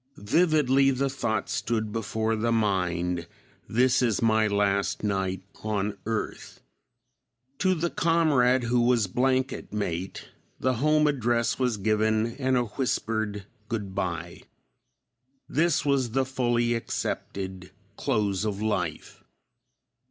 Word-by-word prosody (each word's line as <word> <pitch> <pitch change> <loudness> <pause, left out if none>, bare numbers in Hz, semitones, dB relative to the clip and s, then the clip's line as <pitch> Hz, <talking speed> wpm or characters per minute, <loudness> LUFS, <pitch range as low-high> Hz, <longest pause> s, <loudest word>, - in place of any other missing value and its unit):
Vividly 140 - +3
the 135 +1 0
thought 110 -6 -1
stood 110 -2 -2
before 110 0 -1
the 115 +2 0
mind, 90 -5 0 0.4
"This 125 +3 +3
is 115 -5 +1
my 110 -1 +3
last 100 -1 0
night 95 -2 -1 0.2
on 105 -1 -1
earth." 110 -1 -4 1.0
To 185 0 +3
the 170 +1 -1
comrade 145 -7 +3
who 120 +1 +2
was 120 -2 +3
blanket 130 +6 0
mate 95 -3 -4 0.3
the 130 -2 +1
home 150 0 +4
address 120 -5 +1
was 125 -4 +1
given 110 +2 +1
and 130 -2 +1
a 125 - +2
whispered 110 -4 -2 0.2
good 105 -5 -3
bye. 90 -4 -3 1.1
This 165 +1 +1
was 135 -4 +2
the 135 +3 +1
fully 120 -2 +1
accepted 95 -5 -4 0.3
close 100 -2 0
of 105 -2 -2
life. 95 -7 -3
115 Hz, 115 wpm, -27 LUFS, 100-130 Hz, 1.1 s, home